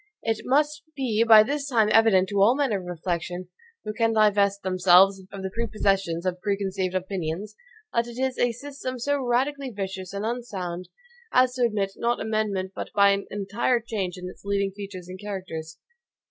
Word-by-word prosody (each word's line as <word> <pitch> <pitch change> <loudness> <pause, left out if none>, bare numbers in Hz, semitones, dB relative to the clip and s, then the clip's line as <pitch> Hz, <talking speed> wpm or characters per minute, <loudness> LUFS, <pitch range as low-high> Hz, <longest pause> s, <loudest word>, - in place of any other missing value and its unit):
It 225 -1 0
must 295 +3 +2
be 235 -5 +1
by 220 -2 +8
this 285 +4 -3
time 220 -5 +3
evident 215 -5 +5
to 200 -1 +1
all 225 +6 +5
men 280 -5 +1
of 190 -3 -2
reflection, 175 +1 -4 0.4
who 215 - -3
can 225 0 +1
divest 200 -2 +3
themselves 190 +1 +5
of 195 -1 -7
the 190 - -3
prepossessions 195 -6 0
of 180 -1 -2
preconceived 195 -2 -1
opinions, 185 +2 -3 0.4
that 235 0 +1
it 240 0 -9
is 260 0 -1
a 245 - +3
system 260 +1 -6
so 285 +3 0
radically 265 +3 0
vicious 190 -4 -5
and 200 +1 -4
unsound, 195 -7 -4 0.4
as 255 0 +4
to 250 -1 +1
admit 205 -4 -1
not 240 +1 0
of - - -4
amendment 210 -4 -1
but - - -6
by 200 0 +6
an 200 0 -1
entire 205 +5 0
change 205 -6 -4
in 180 0 -7
its 180 - -11
leading 200 -1 0
features 195 -3 -8
and 185 +1 -9
characters. 185 -6 -6
205 Hz, 180 wpm, -25 LUFS, 190-235 Hz, 0.4 s, by